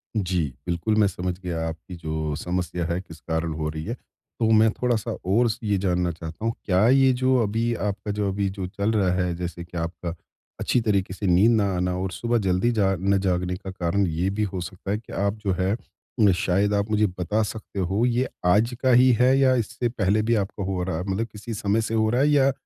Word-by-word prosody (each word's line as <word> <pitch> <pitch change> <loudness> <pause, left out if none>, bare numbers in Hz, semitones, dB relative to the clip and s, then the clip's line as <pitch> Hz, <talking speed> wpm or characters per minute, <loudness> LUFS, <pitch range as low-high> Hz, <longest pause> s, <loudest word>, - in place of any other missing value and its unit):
जी, 90 -9 0
बिल्कुल। 85 +6 0
मैं 105 - +5
समझ 90 -1 -3
गया 85 -3 -3
आपकी 85 +3 -7
जो 80 -2 -3
समस्या 90 +1 -2
है, 85 +2 -1
किस 80 -3 -13
कारण 80 0 -2
हो 75 0 -2
रही 80 0 -5
है। 115 - -3 0.5
तो 110 -1 +2
मैं 110 0 +6
थोड़ा-सा 120 -2 -1
और 110 +6 +3 0.2
ये 105 -2 +1
जानना 90 -2 0
चाहता 80 +5 -7
हूँ 115 - +1
क्या 95 +3 +3
ये 135 0 +5
जो 130 0 +3
अभी 115 +3 0 0.2
आपका 100 +1 -4
जो 100 -1 -1
अभी 100 0 -1
जो 95 - -3
चल 100 +3 -1
रहा 100 -5 +2
है 90 -1 0
जैसे 85 0 -5
कि 85 0 -9
आपका 85 +1 -4 0.5
अच्छी 120 - +1
तरीके 100 -4 0
से 100 - -5
नींद 95 +7 +5
ना - - +2
आना 90 0 0
और 95 0 -2
सुबह 120 +4 0
जल्दी 95 +6 +2
ज 95 -1 +3
न 100 +1 +3
जागने 90 -1 0
का 95 0 -7
कारण 95 +2 0
ये 85 +4 -1
भी 105 +2 -1
हो 95 -3 -3
सकता 95 +3 -6
है 105 - +1
कि 110 - -12
आप 100 +1 0
जो 95 - +2
है 95 +1 +1
अ, 110 -3 -1
शायद 100 +3 +1
आप 100 +1 0
मुझे 105 0 +3
बता 105 +5 0
सकते 105 -1 -6
हो 95 +6 +1
ये 125 +1 +1 0.2
आज 110 +7 +3
का 130 - +3
ही 125 +1 +6
है 130 +2 +5
या 130 -1 +5
इससे 120 +1 -1
पहले 105 -2 +1
भी 115 +2 +1
आपका 100 -1 -2
हो 95 -1 -2
रहा 90 -3 -2
है? 90 - -3
मतलब 110 +5 -1
किसी 110 +2 -7
समय 105 +1 0
से 110 +1 -3
हो 110 -1 +2
रहा 125 +3 +2
है 150 - +4
या 140 -2 +4
100 Hz, 230 wpm, -24 LUFS, 90-110 Hz, 0.5 s, मैं